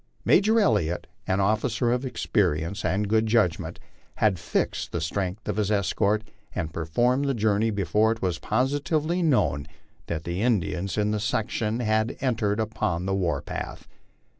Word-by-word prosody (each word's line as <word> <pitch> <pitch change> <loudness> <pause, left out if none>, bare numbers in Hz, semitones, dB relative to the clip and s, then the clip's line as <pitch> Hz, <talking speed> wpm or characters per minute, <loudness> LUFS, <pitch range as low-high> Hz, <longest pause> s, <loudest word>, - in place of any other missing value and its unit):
Major 220 +3 +5
Elliott, 95 - +1 0.2
an 95 +1 +1
officer 110 +4 +1
of 125 +2 0
experience 85 -6 0
and 95 +4 0
good 110 +1 +2
judgment, 110 -7 +1 0.4
had 100 -5 +2
fixed 85 - -1
the 85 - -2
strength 95 +5 -3
of - - -2
his 105 -2 +1
escort 105 +1 +1 0.3
and 80 -4 -3
performed 120 - +1
the 135 -1 0
journey 110 0 +2
before 105 +2 +2
it 115 - -2
was 90 -5 -1
positively 145 - 0
known 100 - +2 0.4
that 80 -2 -3
the 85 +3 -3
Indians 100 -5 0
in 105 0 +1
that 105 - 0
section 110 +2 -1
had 110 0 +1
en 130 -3 +1
tered 105 -2 0
upon 95 -5 -1
the 95 - 0
war 95 -3 0
path. - - -6
105 Hz, 160 wpm, -26 LUFS, 95-115 Hz, 0.4 s, Major